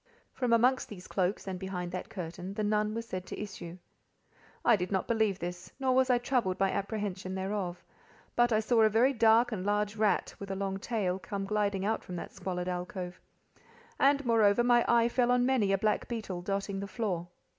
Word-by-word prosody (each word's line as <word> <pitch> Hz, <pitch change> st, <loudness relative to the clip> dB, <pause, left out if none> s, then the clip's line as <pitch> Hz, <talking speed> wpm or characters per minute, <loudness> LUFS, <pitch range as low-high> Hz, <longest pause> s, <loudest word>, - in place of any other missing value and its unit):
From 250 Hz, -2 st, -1 dB
amongst 250 Hz, +3 st, +3 dB
these 185 Hz, -4 st, -9 dB
cloaks, 185 Hz, +1 st, -1 dB
and 190 Hz, -2 st, -4 dB
behind 180 Hz, -2 st, -4 dB
that 185 Hz, -, -5 dB
curtain, 180 Hz, +1 st, -6 dB
the 215 Hz, -, -1 dB
Nun 210 Hz, +1 st, +1 dB
was 230 Hz, 0 st, -3 dB
said 185 Hz, -3 st, -5 dB
to -, -, -6 dB
issue. 185 Hz, -4 st, -7 dB, 0.9 s
I 235 Hz, -, +7 dB
did 185 Hz, -1 st, -3 dB
not 190 Hz, -1 st, 0 dB
believe 220 Hz, -4 st, +1 dB
this, 175 Hz, 0 st, -6 dB
nor 260 Hz, -1 st, +2 dB
was 260 Hz, 0 st, +3 dB
I 250 Hz, -, +5 dB
troubled 240 Hz, -6 st, 0 dB
by 195 Hz, -1 st, +2 dB
apprehension 195 Hz, -2 st, -3 dB
thereof; 190 Hz, -2 st, -3 dB, 0.5 s
but 240 Hz, 0 st, +4 dB
I 215 Hz, -1 st, +3 dB
saw 225 Hz, +1 st, +3 dB
a 220 Hz, -, +6 dB
very 240 Hz, +6 st, +3 dB
dark 230 Hz, +1 st, +4 dB
and 195 Hz, -5 st, -3 dB
large 205 Hz, +1 st, 0 dB
rat, 215 Hz, -1 st, +1 dB
with 200 Hz, -, -7 dB
a 195 Hz, -, -2 dB
long 195 Hz, 0 st, -2 dB
tail, 195 Hz, -4 st, -1 dB
come 195 Hz, +2 st, -4 dB
gliding 200 Hz, -1 st, 0 dB
out 220 Hz, +1 st, 0 dB
from 180 Hz, -, -7 dB
that 170 Hz, -, -6 dB
squalid 180 Hz, -1 st, -4 dB
alcove; 180 Hz, 0 st, -4 dB, 0.8 s
and, 280 Hz, 0 st, +4 dB
moreover, 225 Hz, -1 st, +4 dB
my 240 Hz, -1 st, +5 dB
eye 235 Hz, -1 st, +4 dB
fell 240 Hz, 0 st, +1 dB
on 245 Hz, 0 st, +3 dB
many 250 Hz, -7 st, +2 dB
a 195 Hz, -, +3 dB
black 210 Hz, +2 st, 0 dB
beetle, 210 Hz, -7 st, -4 dB
dotting 195 Hz, +1 st, -2 dB
the 200 Hz, -, -4 dB
floor. 185 Hz, -5 st, -2 dB
205 Hz, 200 wpm, -30 LUFS, 185-230 Hz, 0.9 s, I